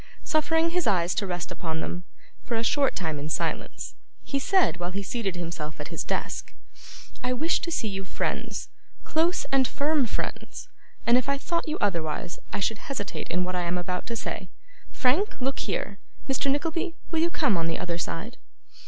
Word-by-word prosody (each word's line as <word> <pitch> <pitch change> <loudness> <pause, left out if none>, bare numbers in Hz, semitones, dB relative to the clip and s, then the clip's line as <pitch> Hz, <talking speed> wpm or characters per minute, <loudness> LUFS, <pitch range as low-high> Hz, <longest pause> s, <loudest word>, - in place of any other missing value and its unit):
Suffering 325 +2 +3
his 355 -4 +1
eyes 180 -4 +4
to 200 - 0
rest 175 -1 -2
upon 160 -3 -2
them, 175 +2 -3 0.4
for 235 - -2
a 225 - +1
short 275 +3 +3
time 160 -5 -1
in 150 +2 -3
silence, - - -2 0.3
he 275 - 0
said, 370 - +4
while 175 0 -1
he 195 +2 -2
seated 195 -2 -1
himself 165 -3 -4
at - - -4
his - - -2
desk: - - -2 0.7
'I 250 0 +2
wish 315 +7 +3
to - - -2
see 275 -9 +1
you 195 -1 -2
friends 185 - -2 0.3
close 330 +3 +2
and 270 -2 +5
firm 290 -3 +2
friends - - -4 0.4
and 240 +1 +7
if 255 - -3
I 280 - +3
thought 335 +4 0
you 310 - 0
otherwise, 170 -3 0
I - - -1
should 205 +2 +1
hesitate 225 -8 -3
in 180 +2 +2
what 180 0 -2
I 180 - +1
am 175 +1 0
about 180 0 -2
to 235 - -2
say. - - -3 0.4
Frank, 300 +12 +2
look 265 +1 0
here! 200 -1 -2 0.3
Mr. 270 0 +2
Nickleby, 330 +4 +1 0.2
will 325 - +2
you 335 +1 +4
come 295 - +3
on 165 -1 +1
the 165 - 0
other 170 -1 -2
side? 205 +8 -3
230 Hz, 190 wpm, -28 LUFS, 180-295 Hz, 0.7 s, and